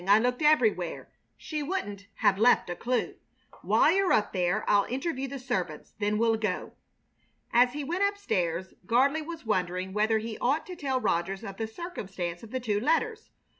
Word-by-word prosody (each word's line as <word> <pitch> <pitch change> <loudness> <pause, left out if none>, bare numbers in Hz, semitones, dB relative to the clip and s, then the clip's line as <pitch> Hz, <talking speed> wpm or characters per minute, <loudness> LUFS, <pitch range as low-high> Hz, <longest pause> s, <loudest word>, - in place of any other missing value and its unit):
I 200 +1 +7
looked 250 +4 0
everywhere. 225 - +2 0.3
She 305 0 -4
wouldn't 205 - -4
have 190 - +2
left 230 -5 +4
a - - -3
clue. 250 +5 -1 0.4
While - - +4
you're 390 -1 +2
up 210 - +2
there 185 +2 0
I'll 200 -1 +4
interview 270 +1 -3
the 275 +1 -6
servants. 190 - -4
Then 210 0 +1
we'll 225 0 +3
go." 215 -4 -3 0.8
As 245 +1 +5
he 295 0 -4
went 345 +7 -2
up 400 0 +1
stairs 185 - -2
Gardley 275 +7 +3
was 325 -3 -8
wondering 185 -2 -1
whether 215 +2 +2
he 220 0 -5
ought 280 +6 +1
to 365 - -7
tell 265 -5 -1
Rogers 190 -1 -1
of 195 -3 -7
the 225 - -2
circumstance 195 - -5
of 225 - -11
the 260 - -2
two 215 -4 0
letters. 440 - 0
225 Hz, 180 wpm, -28 LUFS, 195-285 Hz, 0.8 s, I